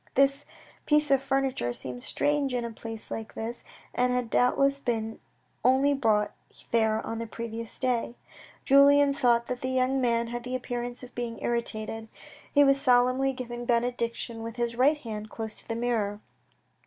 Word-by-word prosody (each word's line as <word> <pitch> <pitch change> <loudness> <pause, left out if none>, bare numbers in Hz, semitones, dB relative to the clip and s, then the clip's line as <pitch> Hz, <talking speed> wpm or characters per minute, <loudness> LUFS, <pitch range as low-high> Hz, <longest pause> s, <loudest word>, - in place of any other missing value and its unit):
This 275 +1 +3 0.4
piece 300 -1 +3
of 270 -1 +4
furniture 270 - 0
seemed 125 0 -5
strange 290 - 0
in 240 -1 -1
a 235 - -4
place 225 0 -8
like 225 -1 -6
this, 230 +2 -5 0.3
and 250 0 +2
had 250 -2 -1
doubt 250 - +3
less 275 0 +2
been 225 -4 -2 0.4
only 265 +4 +4
brought 220 -6 +2 0.4
there 220 -1 +2
on 225 - -4
the 230 - -4
previous 230 0 -6
day. 245 -2 -1 0.5
Julien 280 +1 +6
thought 235 -3 +2
that 250 0 -4
the 260 - -2
young 260 +1 +1
man 235 -1 +1
had 240 0 -4
the 250 +1 -3
appearance 245 0 -4
of 250 - -11
being 235 -1 -4
irritated. 225 -1 -2 0.4
He 285 - +6
was 275 0 +4
solemnly 255 0 +4
giving 240 -2 -6
benedictions 235 -1 -1
with 230 0 -6
his 235 -1 -2
right 280 +5 +4
hand 215 -6 -7
close 220 -1 -4
to - - -16
the 225 - -2
mirror. 225 -4 -1
240 Hz, 170 wpm, -28 LUFS, 230-265 Hz, 0.5 s, Julien